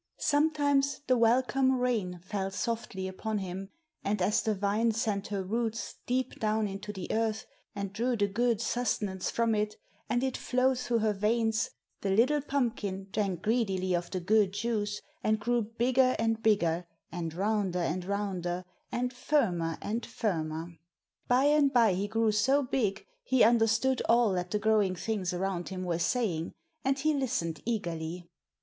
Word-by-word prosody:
Sometimes 290 -2 +2
the 255 - +3
welcome 255 +3 +3
rain 215 -9 -1
fell 195 0 -2
softly 200 -2 -3
upon 215 +3 -3
him, 190 0 -5 0.3
and 205 +1 0
as 210 +4 +2
the 215 -1 0
vine 205 +4 +1
sent 215 -3 -1
her 200 -2 -2
roots 225 +2 -2
deep 255 +1 -1
down 215 0 +1
into 200 +1 -6
the 190 -3 -6
earth 220 -1 0 0.3
and 200 -1 -4
drew 235 +3 0
the 205 - +3
good 230 +2 +1
sustenance 210 -6 -1
from 230 -1 +1
it, 210 0 0 0.3
and 240 +1 +1
it 265 -1 0
flowed 255 0 +1
through 245 -2 0
her 215 -1 +1
veins, 220 +2 +1 0.3
the 200 - -1
little 250 +9 +3
pumpkin 225 -9 -2
drank 195 -4 -1
greedily 195 -5 +1
of 175 0 -2
the 185 - -2
good 200 +1 +3
juice, 210 -1 -1 0.2
and 215 0 +2
grew 240 +2 +1
bigger 250 +4 +2
and 225 0 0
bigger, 175 -6 +2 0.2
and 165 -2 -4
rounder 200 -1 0
and 180 +1 -1
rounder, 185 -2 -2 0.3
and 250 +1 -1
firmer 185 - 0
and 225 +3 -2
firmer. 165 -4 -3 0.5
By 250 +2 +4
and 290 -1 +4
by 230 -6 +5
he 195 +3 -1
grew 225 +1 +2
so 265 +7 +3
big 215 -6 -1 0.2
he 260 -1 +3
understood 225 +3 +3
all 230 -3 +4
that 180 -1 -2
the 210 - 0
growing 210 -3 +2
things 195 -1 -2
around 180 -1 -2
him 185 -1 -4
were 170 -2 -1
saying, 175 -6 0 0.3
and 270 +1 +1
he 310 +3 +1
listened 240 - -1
eagerly. 175 -6 -3
215 Hz, 160 wpm, -30 LUFS, 190-240 Hz, 0.5 s, by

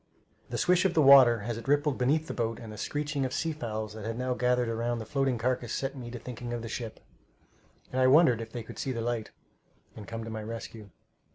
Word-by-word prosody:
The - - -3
swish 180 0 +3
of 190 -3 +1
the 160 - +5
water 130 -5 +8
as 115 -1 -3
it 115 - -11
rippled 145 0 +2
beneath 150 +5 +2
the - - -5
boat 115 -1 -2
and 110 -2 -9
the - - -9
screeching 145 +1 -2
of 130 - -2
sea 165 - 0
fowls 110 -6 -4
that 110 -1 -8
had 115 +1 -3
now 125 0 -1
gathered 125 -1 +1
around 115 +1 -1
the 110 - -6
floating 135 0 0
carcass 125 0 -1
set 135 +1 -2
me 125 -3 -7
to 120 - -6
thinking 120 0 -6
of 120 -1 -4
the - - -5
ship, 115 -1 -6 0.9
and 130 - 0
I 130 - +5
wondered 130 -4 +5
if 115 0 -8
they 120 -1 -5
would - - -9
see 130 - -2
the 115 - -3
light 115 -1 -2 0.7
and 105 -2 -9
come 115 0 -5
to 115 - -6
my 110 0 -4
rescue. 110 -1 -7
120 Hz, 245 wpm, -29 LUFS, 115-135 Hz, 0.9 s, water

